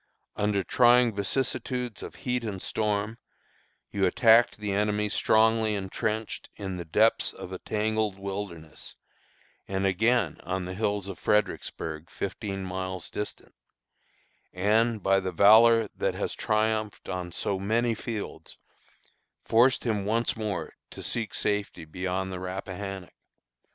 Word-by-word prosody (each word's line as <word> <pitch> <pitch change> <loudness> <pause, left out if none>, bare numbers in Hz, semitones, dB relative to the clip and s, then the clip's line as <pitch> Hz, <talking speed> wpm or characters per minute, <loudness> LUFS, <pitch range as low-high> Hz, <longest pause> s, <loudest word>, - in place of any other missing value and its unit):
"Under 105 -1 +1
trying 120 +2 +5
vicissitudes 125 +3 -2
of - - -8
heat 125 -1 0
and 105 -4 -4
storm, 105 +2 -1 0.7
you 100 -2 +2
attacked 115 +4 +5
the 105 -1 -3
enemy 105 +1 +1
strongly 110 0 +3
intrenched 105 +3 -3
in 95 -3 -5
the 85 - -6
depths 110 +8 +3
of 90 - -9
a 95 - -5
tangled 110 -1 -1
wilderness, 95 -5 -6 0.7
and 95 0 -1
again 105 -1 +2
on 95 0 -2
the 90 - -5
hills 100 -1 -1
of 100 - -7
Fredericksburg, 80 -6 -1
fifteen 100 0 -4
miles 95 -1 -4
distant, 105 - -6 1.0
and, 110 +3 +2
by 95 0 +4
the 95 -1 -3
valor 110 +4 +6
that - - -1
has - - -2
triumphed 110 0 -1
on 90 -1 -4
so 95 +2 -1
many 115 +4 +1
fields, 110 -1 -6 0.9
forced 120 +3 +4
him 110 -4 0
once 115 +4 +1
more 105 -4 -3 0.2
to - - -9
seek 115 -2 -3
safety 105 -5 -1
beyond 95 +3 -3
the 90 - -4
Rappahannock. 95 0 -6
105 Hz, 130 wpm, -27 LUFS, 95-110 Hz, 1.0 s, valor